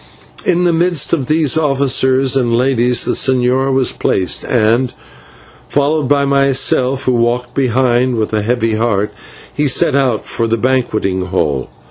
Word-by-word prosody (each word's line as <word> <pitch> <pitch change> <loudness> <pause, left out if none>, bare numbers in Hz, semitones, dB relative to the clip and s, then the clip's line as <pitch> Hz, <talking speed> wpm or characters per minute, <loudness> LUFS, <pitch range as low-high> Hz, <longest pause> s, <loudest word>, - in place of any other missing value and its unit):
In 180 0 +1
the 175 -1 +2
midst 170 -2 0
of 140 -7 -1
these 155 -3 +1
officers 135 -2 +1
and 120 -3 +1
ladies 125 -1 +1
the - - -1
señor 130 +1 +1
was 130 -1 +1
placed, 95 - -1
and, 120 +2 +1 0.8
followed 145 0 0
by 140 0 +2
myself, 135 -1 +1
who 130 - 0
walked 120 +1 -1
behind 125 -1 +1
with 110 -1 -3
a 105 - +1
heavy 115 0 -1
heart, 105 -3 -1 0.4
he 150 0 0
set 135 - +2
out 130 -6 0
for 115 - -3
the 115 +1 0
banqueting 110 -7 -1
hall. 75 -8 -2
130 Hz, 150 wpm, -14 LUFS, 115-135 Hz, 0.8 s, the